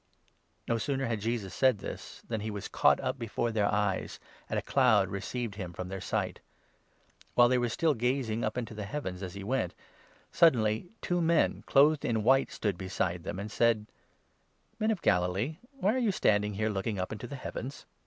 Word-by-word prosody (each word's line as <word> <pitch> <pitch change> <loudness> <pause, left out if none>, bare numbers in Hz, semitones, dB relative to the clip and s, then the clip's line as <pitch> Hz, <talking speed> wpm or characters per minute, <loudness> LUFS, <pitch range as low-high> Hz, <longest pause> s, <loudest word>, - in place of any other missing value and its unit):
No 115 -1 +1
sooner 135 +2 -1
had 115 -4 -2
Jesus 110 -4 -2
said 130 0 +3
this - - -8
than 110 -2 -2
he 110 - -3
was 105 -2 -5
caught - - +4
up - - -2
before 115 +1 -1
9 - - -5
their 105 -2 +2
eyes, 105 -2 -1 0.3
and - - -1
a - - +1
cloud - - +4
received 115 +3 -4
him 90 -4 -5
from 90 +1 -6
their 95 0 -5
sight. - - -2 1.0
While 120 - +7
10 120 - +2
they 130 - +4
were 120 -1 0
still 155 +6 +2
gazing 120 -2 0
up 110 +2 -1
into 115 -2 -3
the 105 -1 -5
heavens, 100 -6 -4
as 95 -1 -6
he 100 - -6
went, 105 -5 -1 0.6
suddenly 115 -4 +3
two 175 0 +1
men, 165 -1 +2
clothed 145 +2 +5
in 110 -2 0
white, 135 +4 +4
stood 100 -5 -2
beside 95 -2 -2
them, 85 - -5
and 105 +2 -5
u - - -9
said: 115 -3 +3 0.5
" - - -41
Men 215 0 +1
of 215 -5 -1
Galilee, 95 - +1 0.2
why 220 -6 +1
are 260 - 0
you 230 -5 +2
standing 105 - +2
here 110 +2 0
looking 100 +1 -2
up 90 0 -3
into 110 +3 -6
the 140 - -7
heavens 130 0 -6
110 Hz, 205 wpm, -30 LUFS, 100-135 Hz, 1.0 s, While